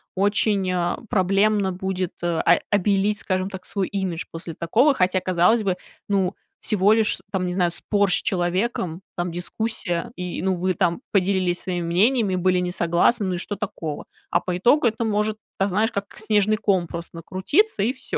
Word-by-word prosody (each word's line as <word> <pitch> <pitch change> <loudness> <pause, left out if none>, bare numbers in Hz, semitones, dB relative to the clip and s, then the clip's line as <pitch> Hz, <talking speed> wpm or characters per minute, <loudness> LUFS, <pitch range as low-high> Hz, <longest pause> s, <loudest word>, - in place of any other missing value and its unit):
очень, 200 0 +2
э, 175 -1 0
проблемно 195 +1 +2
будет, 185 -1 -3
э, 170 -1 0
о - - +4
обелить, 205 +1 +2
скажем 185 0 -1
так, 190 -2 -8
свой 195 -2 -1
имидж 190 -4 -3
после 165 -1 -7
такого. 235 - +3
Хотя, 185 -3 +1
казалось 185 +5 +3
бы, 190 -3 0 0.3
ну, 195 -1 +1 0.2
всего 205 0 +2
лишь, 220 -1 +3
с - - -10
там, 190 -2 -1
не 180 - -2
знаю, 180 -2 +1
спор 200 +2 +1
с - - +4
человеком, 180 -2 -1
там, 175 -1 -2
дискуссия, 175 +2 -3
и 180 -1 -4
ну 190 0 +1
вы 185 +1 0
там 175 +3 0
поделились 185 -2 +1
своими 175 -2 -2
мнениями, 200 +3 +2
были 185 0 +2
не 180 0 -1
согласны, 175 +6 +2
ну, 185 -1 -1
и - - -3
что 205 +3 -4
такого? 165 -7 -5 0.3
А - - +2
по 180 -1 -2
итогу 245 +9 +4
это 225 0 +1
может 210 0 0 0.2
так, 195 +1 +1
знаешь, 215 +5 +1
как 200 0 -2
снежный 215 -1 +2
ком 190 -5 +1
просто 170 +1 -8
накрутиться 195 - 0
и 245 +5 +1
всё. 255 - -4
190 Hz, 185 wpm, -23 LUFS, 180-210 Hz, 0.3 s, о